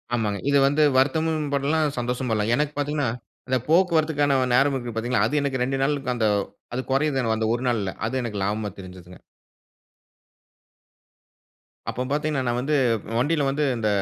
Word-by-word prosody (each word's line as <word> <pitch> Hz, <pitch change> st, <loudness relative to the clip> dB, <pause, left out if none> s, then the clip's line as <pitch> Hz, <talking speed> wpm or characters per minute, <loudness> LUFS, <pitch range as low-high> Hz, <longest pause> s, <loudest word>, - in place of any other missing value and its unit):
ஆமாங்க. 105 Hz, -4 st, -1 dB
இது 140 Hz, -, +4 dB
வந்து 145 Hz, +2 st, +2 dB
வருத்தமும் 155 Hz, +3 st, +1 dB
படலாம், 145 Hz, +1 st, +1 dB
சந்தோஷம் 125 Hz, +1 st, -2 dB
படலாம். 105 Hz, +1 st, 0 dB
எனக்கு 150 Hz, +1 st, -1 dB
பாத்தீங்கன்னா, 145 Hz, -2 st, 0 dB, 0.4 s
இந்த 130 Hz, 0 st, +2 dB
போக்குவரத்துக்கான 160 Hz, -5 st, +3 dB, 0.2 s
நேரம் 140 Hz, +1 st, +3 dB
இருக்கு 120 Hz, -3 st, -4 dB
பாரத்தீங்களா, 120 Hz, +2 st, 0 dB
அது 150 Hz, -, 0 dB
எனக்கு 135 Hz, -2 st, -1 dB
2 135 Hz, +2 st, 0 dB
நாளுக்கு 135 Hz, -3 st, 0 dB
அந்த. 110 Hz, -2 st, +1 dB, 0.5 s
அது 130 Hz, -, -1 dB
குறையுது 135 Hz, -1 st, +1 dB
அந்த 110 Hz, -, 0 dB
1 120 Hz, -, -5 dB
நாள்ல. 105 Hz, -5 st, -1 dB, 0.2 s
அது 115 Hz, -, -4 dB
எனக்கு 110 Hz, -4 st, -4 dB
லாபமா 105 Hz, +1 st, -1 dB
தெரிஞ்சுதுங்க. 90 Hz, -1 st, -12 dB, 2.7 s
அப்போ 125 Hz, -, -4 dB
பாத்தீங்கன்னா, 150 Hz, -2 st, 0 dB
நான் 120 Hz, 0 st, 0 dB
வந்து 150 Hz, +3 st, 0 dB, 0.4 s
வண்டில 145 Hz, +3 st, +1 dB
வந்து 145 Hz, +2 st, -1 dB
இந்த 110 Hz, -2 st, -1 dB
135 Hz, 150 wpm, -24 LUFS, 120-150 Hz, 2.7 s, இது